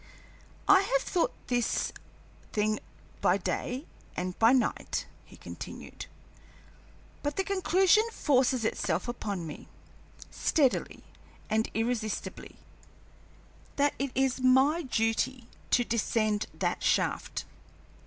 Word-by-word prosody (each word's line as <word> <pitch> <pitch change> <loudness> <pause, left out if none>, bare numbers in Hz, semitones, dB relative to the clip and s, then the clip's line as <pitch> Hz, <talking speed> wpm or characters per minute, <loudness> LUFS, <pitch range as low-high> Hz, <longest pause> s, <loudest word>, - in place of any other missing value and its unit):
"I 390 -1 +8
have - - +1
thought 350 - +1
over - - -26
this 245 -2 0 0.6
thing 215 0 +1 0.4
by - - +4
day 255 +5 -3 0.3
and 180 0 -2
by 225 +1 +6
night," 260 -1 0 0.2
he - - -15
continued, - - -8 1.1
"but 290 0 -2
the 385 - +1
conclusion 385 +2 +3
forces 255 - +2
itself 185 -3 -1
upon 205 -7 -3
me, 150 - -8 0.6
steadily 280 -6 +1 0.5
and 220 +1 +2
irresistibly, 225 -1 -2 1.2
that 285 0 +2
it 275 +1 0
is 265 0 +1
my 265 +6 +4
duty 235 -1 0 0.2
to 245 - +4
descend 215 -2 0
that - - -1
shaft. - - 0
250 Hz, 105 wpm, -29 LUFS, 220-290 Hz, 1.2 s, I